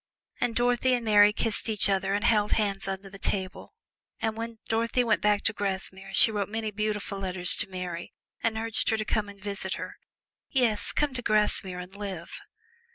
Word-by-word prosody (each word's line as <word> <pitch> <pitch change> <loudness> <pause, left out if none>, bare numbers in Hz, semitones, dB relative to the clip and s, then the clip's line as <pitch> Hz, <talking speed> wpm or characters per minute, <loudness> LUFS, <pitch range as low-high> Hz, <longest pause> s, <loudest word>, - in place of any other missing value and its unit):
And 245 -2 0
Dorothy 245 +1 +3
and 240 -1 -3
Mary 205 -1 +7
kissed 225 +1 -1
each 210 -3 +1
other 195 0 +1
and 205 - -1
held 210 -3 +3
hands 200 -3 0
under 195 0 -4
the 195 0 -11
table, 190 -1 -2 0.4
and 220 -1 -1
when 230 0 -5
Dorothy 230 +2 +1
went 230 - +2
back 210 -1 +2
to 225 - +2
Grasmere 195 -1 -3
she 225 - +6
wrote 205 -2 -2
many 220 0 -3
beautiful 210 -1 -2
letters 185 -2 +1
to - - -2
Mary 180 -2 -5 0.3
and 225 -1 0
urged 225 0 0
her 220 - +2
to 215 - -2
come 210 -1 -1
and 200 -1 -12
visit 200 0 -2
her - - -7 0.5
yes, 230 -6 +1
come 295 -2 0
to 255 - -3
Grasmere 210 -4 +1
and 180 +2 -8
live. 195 -4 -6
210 Hz, 190 wpm, -28 LUFS, 195-225 Hz, 0.5 s, Mary